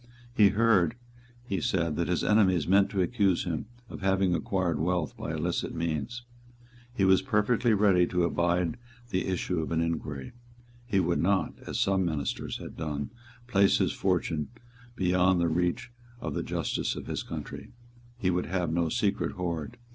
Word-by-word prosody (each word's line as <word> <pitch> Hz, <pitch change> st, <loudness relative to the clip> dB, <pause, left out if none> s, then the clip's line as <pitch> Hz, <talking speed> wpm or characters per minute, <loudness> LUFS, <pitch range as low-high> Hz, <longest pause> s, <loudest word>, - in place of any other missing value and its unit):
He 105 Hz, -4 st, +6 dB
heard, 105 Hz, -2 st, +3 dB, 0.5 s
he 100 Hz, -7 st, -2 dB
said, 85 Hz, -4 st, 0 dB
that 85 Hz, -, -1 dB
his 90 Hz, -, 0 dB
enemies 95 Hz, -6 st, +3 dB
meant 100 Hz, +2 st, +4 dB
to 95 Hz, -2 st, +1 dB
accuse 100 Hz, -3 st, +1 dB
him 85 Hz, +2 st, -3 dB, 0.2 s
of -, -, -9 dB
having 95 Hz, -1 st, +2 dB
acquired 85 Hz, -1 st, 0 dB
wealth 85 Hz, -2 st, 0 dB
by -, -, -5 dB
illicit 80 Hz, +2 st, -2 dB
means. 85 Hz, -, -3 dB, 0.7 s
He 120 Hz, -6 st, +1 dB
was 95 Hz, 0 st, +5 dB
perfectly 115 Hz, -1 st, +2 dB
ready 95 Hz, -4 st, +4 dB
to 90 Hz, -1 st, 0 dB
abide 85 Hz, +4 st, +1 dB, 0.3 s
the 95 Hz, -, 0 dB
issue 90 Hz, -1 st, -1 dB
of 80 Hz, -, -3 dB
an 80 Hz, -, +1 dB
inquiry. 75 Hz, -5 st, -3 dB, 0.6 s
He 100 Hz, -5 st, +2 dB
would 85 Hz, -2 st, +1 dB
not, 95 Hz, +2 st, +1 dB
as -, -, -2 dB
some 95 Hz, -1 st, +2 dB
ministers 75 Hz, -5 st, -2 dB
had -, -, -9 dB
done, 75 Hz, +1 st, -4 dB, 0.3 s
place 100 Hz, -5 st, +4 dB
his -, -, +1 dB
fortune 85 Hz, -5 st, 0 dB, 0.5 s
beyond 90 Hz, -1 st, +3 dB
the 85 Hz, -1 st, +2 dB
reach 90 Hz, +6 st, -1 dB, 0.3 s
of -, -, -4 dB
the -, -, -1 dB
justice -, -, -2 dB
of -, -, -7 dB
his -, -, -3 dB
country. -, -, -7 dB, 0.5 s
He 95 Hz, -6 st, +1 dB
would 90 Hz, 0 st, -1 dB
have 85 Hz, -2 st, -1 dB
no 85 Hz, -1 st, +1 dB
secret -, -, 0 dB
hoard. 85 Hz, -4 st, -4 dB
90 Hz, 165 wpm, -28 LUFS, 85-100 Hz, 0.7 s, He